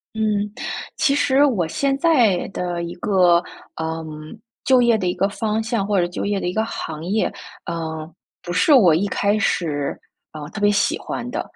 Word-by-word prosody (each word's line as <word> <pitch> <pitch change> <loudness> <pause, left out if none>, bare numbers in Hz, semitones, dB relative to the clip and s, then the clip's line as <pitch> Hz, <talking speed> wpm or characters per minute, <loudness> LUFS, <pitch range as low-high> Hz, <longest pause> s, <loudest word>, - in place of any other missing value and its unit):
嗯， 210 -1 0 0.4
其 275 - +2
实 280 0 +3
我 195 - +1
现 270 - 0
在 250 - +3
的 175 -2 -3
一 170 +1 -6
个， 180 -2 +3 0.4
嗯， 160 0 -3 0.6
就 260 -2 +4
业 235 -2 +4
的 185 - -2
一 180 - +1
个 195 - +1
方 220 +1 -1
向 225 -3 -1
或 200 -2 +1
者 175 - +1
就 180 - -4
业 200 -1 0
的 - - -3
一 180 - -2
个 220 - +1
行 160 -8 -6
业， 205 +5 0 0.3
呃， 160 -1 -5 0.3
不 175 - -6
是 245 - +4
我 180 - +6
一 195 +5 +1
开 205 +1 +1
始， 150 -8 -1 0.4
呃， 150 -1 -8
特 210 - -7
别 205 0 +4
喜 200 - +1
欢 245 - -5
的， 300 - -2
200 Hz, 205 characters per minute, -21 LUFS, 170-225 Hz, 0.6 s, 我